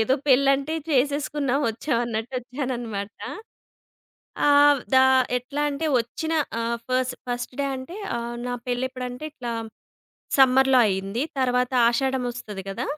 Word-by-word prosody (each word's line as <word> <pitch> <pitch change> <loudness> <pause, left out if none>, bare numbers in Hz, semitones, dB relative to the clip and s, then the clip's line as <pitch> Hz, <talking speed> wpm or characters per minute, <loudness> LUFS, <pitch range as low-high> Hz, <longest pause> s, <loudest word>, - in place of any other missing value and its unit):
ఏదో 255 +4 +3
పెళ్లంటే 275 +2 +3 0.2
చేసేసుకున్నాం, 285 0 +1
వచ్చాం 230 +3 -1
అన్నట్టు 230 +1 -4
వచ్చాననమాట. 245 -5 -4 1.4
ఆహ్, 290 -1 +6
దా 260 0 +7 0.3
ఎట్లాంటే 290 +4 -2
వచ్చిన 250 +8 -4 0.3
ఆహ్, 230 +1 -1
ఫస్ 255 0 +1 0.2
ఫస్ట్ 245 +1 -4
డే 280 - +1
అంటే 260 +8 -8 0.2
ఆహ్, 235 0 -5
నా 245 - -2
పెళ్లి 250 +1 -1
ఎప్పుడంటే 255 +1 -6
ఇట్లా 245 -5 -5 0.9
సమ్మర్‌లో 265 0 +6
అయింది. 195 +4 -2 0.2
తర్వాత 250 -1 +1 0.2
ఆషాఢమొస్తది 240 -5 -2
కదా! 230 +6 -3
255 Hz, 115 wpm, -24 LUFS, 240-275 Hz, 1.4 s, దా